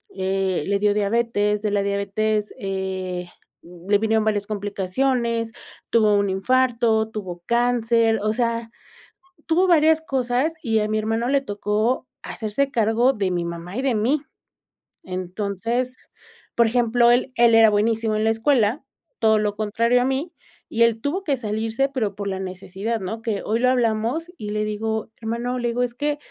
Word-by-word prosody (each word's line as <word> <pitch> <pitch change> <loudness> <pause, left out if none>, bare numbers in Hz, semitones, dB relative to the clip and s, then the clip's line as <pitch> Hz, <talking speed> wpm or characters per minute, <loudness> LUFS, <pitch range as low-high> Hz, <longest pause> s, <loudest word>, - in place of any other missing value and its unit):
eh, 190 -2 -1
le 200 0 +2
dio 205 0 +3
diabetes, 210 0 0
de 210 - 0
la 205 -1 +1
diabetes, 205 +2 -1
eh, 190 -2 -3 0.4
le 180 +4 -1
vinieron 220 +1 +1
varias 210 -2 0
complicaciones, 225 +4 -1 0.4
tuvo 215 -2 +4
un 200 -1 +2
infarto, 230 +1 +2
tuvo 185 -5 -6
cáncer, 235 -1 +2
o 215 +1 +1
sea, 230 -1 -1 0.8
tuvo 355 +3 +2
varias 320 -2 +5
cosas 265 +1 0
y 225 -1 +1
a 210 - 0
mi 215 0 0
hermano 225 +2 -1
le 275 +1 +2
tocó 215 +3 -1 0.2
hacerse 240 +5 -2
cargo 230 +2 +3
de 205 -7 -1
mi 175 -1 -1
mamá 170 +2 -6
y - - 0
de 265 -2 +1
mí. 250 +8 +1 0.8
Entonces, 200 +7 -3 0.6
por 235 -1 +4
ejemplo, 240 0 +3
él 250 +2 +1
él 235 -1 +5
era 225 -1 +7
buenísimo 220 +1 +1
en 215 - 0
la 220 - +3
escuela, 225 +2 +2 0.4
todo 220 -1 +4
lo 210 -1 -1
contrario 230 +3 +2
a - - +1
mí, 270 +6 -1 0.4
y 235 - +2
él 230 -1 +2
tuvo 320 - -2
que 285 - +1
salirse, 225 +3 -1
pero 215 -7 -1
por 200 0 -4
la 190 -1 -3
necesidad, 190 +4 -4
¿no? 220 +4 -5
Que 220 -3 -2
hoy 225 +2 0
lo 250 +1 +3
hablamos 245 +7 0
y 210 -1 -5
le 210 0 -1
digo 220 +1 -3
hermano, 235 +2 -3
le 240 - -1
digo, 245 +1 0
es 245 -1 -2
que. 295 +2 -1
220 Hz, 165 wpm, -22 LUFS, 205-245 Hz, 0.8 s, era